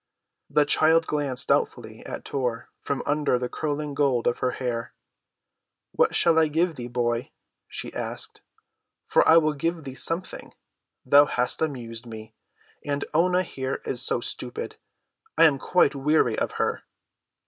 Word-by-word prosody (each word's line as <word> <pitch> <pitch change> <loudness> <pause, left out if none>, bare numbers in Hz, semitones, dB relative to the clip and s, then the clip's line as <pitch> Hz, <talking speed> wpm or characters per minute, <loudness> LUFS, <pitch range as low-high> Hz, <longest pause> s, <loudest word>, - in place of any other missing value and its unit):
The 150 - +3
child 160 +2 +3
glanced 145 -5 -1
doubtfully - - -1
at - - -7
Tor 125 -4 -3
from 140 - -3
under 145 -3 +1
the 125 0 -3
curling 150 +1 -3
gold 140 -4 +1
of 120 - +1
her 125 - +1
hair. 120 -2 -3 1.0
"What - - +2
shall 165 -1 +4
I 160 - +4
give 165 +3 +1
thee, 125 -5 -7
boy?" 120 -1 -1 0.4
she - - -6
asked. - - -4 0.6
"For - - +3
I 160 - +8
will 155 -2 +3
give 165 +3 -2
thee 135 -2 -7
something; 165 +7 -3 0.5
thou 145 +3 +7
hast 125 -3 -1
amused 120 -6 -4
me, 110 -1 -10 0.5
and 145 0 -2
Oonah 180 +3 +3
here 130 -5 -4
is - - 0
so - - +1
stupid. 460 +2 -4 0.6
I - - +6
am 140 -4 +4
quite 165 -1 +3
weary 150 +3 +2
of - - -2
her." - - -1
145 Hz, 150 wpm, -25 LUFS, 125-160 Hz, 1.0 s, I